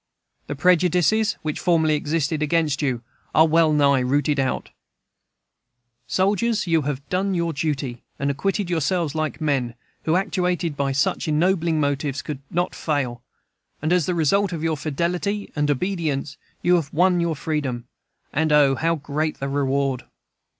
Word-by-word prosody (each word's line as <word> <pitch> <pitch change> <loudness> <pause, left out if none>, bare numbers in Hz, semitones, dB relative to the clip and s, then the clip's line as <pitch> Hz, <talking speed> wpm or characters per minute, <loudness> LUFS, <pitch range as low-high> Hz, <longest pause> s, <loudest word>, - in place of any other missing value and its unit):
The 145 - -4
prejudices 180 +6 +3
which 155 -1 -3
formerly 160 -3 +2
existed 150 0 -1
against 155 -2 +1
you 125 -5 -1 0.3
are 160 - +7
wellnigh 150 -4 +4
rooted 145 +3 +1
out 130 -1 -1 1.4
Soldiers, 205 +4 +1
you 165 -2 +2
have 140 -1 -4
done 190 +1 0
your 170 -1 0
duty, 140 -5 -2 0.2
and 140 -1 0
acquitted 195 +6 -1
yourselves 170 -2 0
like 155 -1 -2
men, 135 -6 -1 0.3
who, 160 - +2
actuated 180 -4 0
by 140 -1 0
such 140 +4 0
ennobling 165 +1 +2
motives, 140 -1 -1
could 145 -2 -5
not 175 +2 -1
fail; 135 -6 -2 0.6
and 155 +3 0
as 180 -4 +2
the 180 - 0
result 185 +5 +2
of 165 -2 -4
your 165 -1 +1
fidelity 175 +8 -2
and 150 -1 0
obedience, 150 -3 -1 0.3
you 180 0 +5
have 155 -5 -3
won 180 +2 +3
your 170 -2 0
freedom. 135 -5 -3 0.5
And 155 +1 +1
O, 145 -2 +5
how 165 +5 +1
great 150 +1 -3
the 135 - -2
reward! 135 -2 0
155 Hz, 150 wpm, -23 LUFS, 140-175 Hz, 1.4 s, are